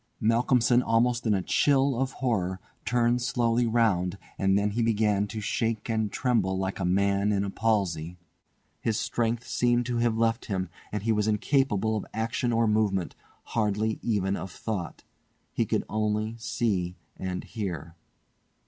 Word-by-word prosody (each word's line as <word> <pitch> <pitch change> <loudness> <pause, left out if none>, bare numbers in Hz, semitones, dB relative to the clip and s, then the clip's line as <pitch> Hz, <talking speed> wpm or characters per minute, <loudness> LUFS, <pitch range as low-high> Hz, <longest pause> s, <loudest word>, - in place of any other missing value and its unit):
Malcolmson, 120 +2 +3
almost 120 +1 +1
in 105 - +3
a 95 - -1
chill 140 +2 +3
of 130 +2 -1
horror, 95 -8 -1 0.3
turned 120 +2 +2
slowly 120 -2 +1
round, 100 -6 +2 0.2
and 95 0 +3
then 100 0 +1
he 115 +4 -1
began 105 -3 +2
to 110 - -5
shake 115 +1 -1
and 110 -2 0
tremble 105 -8 +1
like 95 +1 -2
a 90 - -1
man 100 +2 +2
in 100 -1 +1
a 100 - -3
palsy. 90 -7 0 0.6
His 110 -1 0
strength 120 +1 -1
seemed 120 +1 +1
to 120 -1 -1
have 115 -1 +1
left 115 0 +1
him, 95 -3 -2 0.2
and 105 -1 -3
he 115 - +1
was 105 -1 +1
incapable 110 -1 +1
of 105 - -4
action 115 +2 -1
or 115 0 +3
movement, 105 -4 +1 0.3
hardly 110 0 -1
even 100 -4 0
of 95 +2 -5
thought. 90 -5 -5 0.5
He - - 0
could - - 0
only 110 +1 -1
see 100 -6 -1 0.2
and 90 -1 -4
hear. 85 -7 -5
110 Hz, 155 wpm, -27 LUFS, 100-115 Hz, 0.6 s, Malcolmson